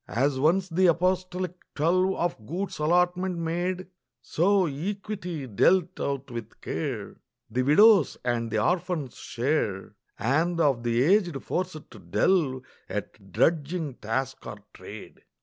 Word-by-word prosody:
As 135 +2 0
once 175 +6 +3
the 185 +1 +3
apostolic 180 +1 0 0.2
twelve 185 +5 +2
Of 170 -11 -3
goods 185 +3 -4
allotment 180 +3 +1
made, 175 +3 -2 0.3
So 190 +3 +2
equity 180 0 -4
dealt 175 - +2
out 140 -1 -3
with 115 -2 -7
care - - -4 0.3
The 125 +3 +1
widow's 180 - +5
and 120 -2 0
the - - -1
orphan's 175 -6 -1
share, 115 -8 -2 0.2
And 160 +8 +1
of 140 -7 +2
the 120 +1 +1
aged 175 -3 +2
forced 160 -4 -4
to - - -12
delve 140 -9 +1 0.3
At - - -6
drudging 160 -2 +1
task 120 +5 -3
or - - -6 0.2
trade. - - -11
165 Hz, 130 wpm, -27 LUFS, 135-185 Hz, 0.3 s, widow's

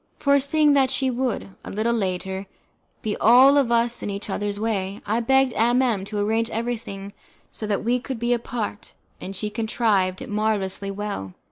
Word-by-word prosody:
Foreseeing 280 +2 +3
that 265 -2 +3
we 265 -1 +1
would, 250 -4 -2
a - - -8
little 220 +3 0
later, 190 -2 -2 0.6
be 215 -1 -1
all 255 +5 +7
of 275 -5 +3
us 235 0 +2
in - - -3
each 200 +1 -4
other's 205 0 -2
way, 205 -3 -2
I 220 +3 0
begged 265 +1 +3
M 240 +3 +3
M 215 -7 0
to 210 +1 -5
arrange 220 +3 +1
everything 225 -4 -4 0.4
so 215 - -6
that 205 -1 -1
we 245 +3 +1
could 260 0 -5
be 240 +2 +1
apart, 235 -3 -4 0.3
and 195 - -6
she 210 +2 -3
contrived 210 -4 0
it - - -7
marvellously 205 -2 -1
well. 195 - -5
220 Hz, 175 wpm, -23 LUFS, 200-245 Hz, 0.6 s, all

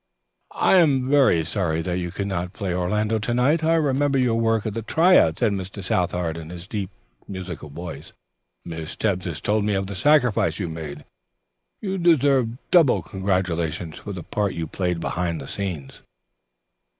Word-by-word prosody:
"I 190 - +4
am 140 -7 +3
very 135 - +4
sorry 85 -3 -1
that 90 +1 -2
you 85 -1 -3
could 100 +3 -4
not 90 -2 -3
play 100 -5 -3
Orlando 105 +5 0
to 115 +3 -2
night. 145 +6 +2
I 165 +1 +3
remember 145 -2 +2
your 125 -3 +2
work 115 -1 +1
at 110 - -2
the 115 - -3
try 170 - +4
out," 80 0 +4
said 115 -3 +2
Mr. 95 0 -5
Southard 90 -3 -1
in 80 -1 -8
his 90 0 -8
deep, 100 -2 -4 0.4
musical 90 -5 -7
voice. 85 +3 -8 0.5
"Miss 80 -2 -6
Tebbs 95 -4 -1
has 80 -4 -4
told 105 0 0
me 105 -1 +1
of 95 0 -1
the 100 - -6
sacrifice 125 - +3
you 90 -5 -3
made. 75 -3 -7 0.8
You 195 -2 -2
deserve 135 -8 +3
double 165 -8 +5
congratulations 90 -4 -2
for 105 - -7
the 90 -3 -6
part 100 +2 -2
you 85 - -3
played 90 +1 -2
behind 85 -1 -2
the 70 - -8
scenes." 85 -9 -5
95 Hz, 175 wpm, -23 LUFS, 85-120 Hz, 0.8 s, double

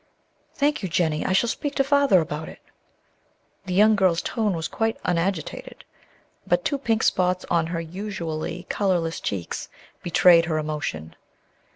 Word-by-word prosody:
"Thank 290 0 +1
you, 190 - -3
Jennie; 155 -1 0
I - - 0
shall 190 +5 +3
speak 285 +4 -3
to 275 - +3
Father 275 - +4
about 155 0 -5
it." - - -12 1.1
The 180 - -2
young 215 +2 +6
girl's 185 -4 +2
tone 215 -5 -1
was 160 -1 -3
quite 225 0 -1
unagitated; 175 -1 -2 0.6
but - - +1
two 280 - 0
pink 225 -4 0
spots 180 0 +1
on 165 -2 +2
her 165 0 -3
usually 170 -1 -5
colorless 175 -5 0
cheeks 95 -4 -4 0.3
betrayed 170 -1 +5
her 160 -2 -1
emotion. 150 - -4
180 Hz, 150 wpm, -24 LUFS, 160-210 Hz, 1.1 s, young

